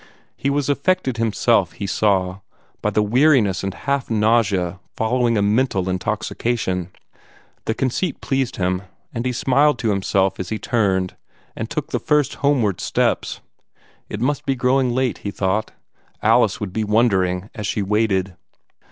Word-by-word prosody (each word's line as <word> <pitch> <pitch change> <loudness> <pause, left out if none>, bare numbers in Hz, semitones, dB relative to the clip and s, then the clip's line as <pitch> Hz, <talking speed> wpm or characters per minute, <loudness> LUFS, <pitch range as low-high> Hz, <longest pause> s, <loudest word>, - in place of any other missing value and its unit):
He 140 - -1
was 140 -1 0
affected 140 -3 +1
himself, 115 -4 +2
he 100 - -5
saw, 95 -2 +1 0.4
by - - +1
the 105 - +1
weariness 120 -4 +3
and 95 - -1
half 140 +6 -2
nausea 105 -5 +2 0.2
following 115 0 +1
a 100 - +2
mental 105 -3 +1
intoxication. 95 -1 -2 0.8
The 110 - -1
conceit 135 +6 -1
pleased 135 -3 -1
him, 90 0 0 0.3
and 120 +1 -2
he - - 0
smiled 135 +3 +3
to 115 -3 0
himself 95 -1 +1
as 95 - -4
he 110 - -2
turned 95 -6 0 0.4
and - - -4
took - - -4
the - - 0
first 150 -3 +1
homeward 125 -9 +2
steps. - - 0 0.7
It 105 - -4
must 140 +5 0
be 135 - 0
growing 130 +1 +2
late, 125 0 0
he 100 - -4
thought. 100 +2 -1 0.5
Alice - - +3
would 100 -3 -5
be 110 - 0
wondering 100 -4 +1
as 105 -3 -4
she 100 - -1
waited. 100 -3 0
110 Hz, 150 wpm, -21 LUFS, 95-125 Hz, 0.8 s, weariness